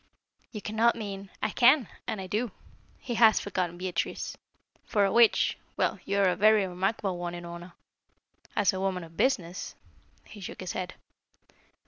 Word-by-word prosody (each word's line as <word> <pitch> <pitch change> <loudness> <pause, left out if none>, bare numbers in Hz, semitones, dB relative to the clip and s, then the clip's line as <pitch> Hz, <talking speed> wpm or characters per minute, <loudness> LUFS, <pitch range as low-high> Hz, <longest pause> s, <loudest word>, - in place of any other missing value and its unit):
"You 210 -3 -7
cannot 225 +2 +2
mean 200 -3 -6
" - - -15
"I 215 - +1
can, 255 0 +5 0.2
and 215 - -2
I 190 - -5
do. 215 +6 -1 0.5
He 245 - -5
has 220 -2 +7
forgotten 180 -3 -2
Beatrice. 180 -1 -3 0.5
For 205 -3 +2
a 195 - +1
witch 235 0 +4 0.2
well, - - +1
you 200 - -1
are 195 -2 +4
a 180 - +1
very 215 -1 +5
remarkable 190 0 -1
one, 175 0 -4
Unorna. 175 +1 -8 0.8
As 205 - +3
a 190 - -3
woman 190 -2 -1
of 165 0 -13
business 180 -8 -1 0.2
" - - -35 0.2
He 205 - -12
shook 190 - -7
his 185 - -4
head. 185 -1 -4
195 Hz, 170 wpm, -28 LUFS, 180-215 Hz, 0.8 s, has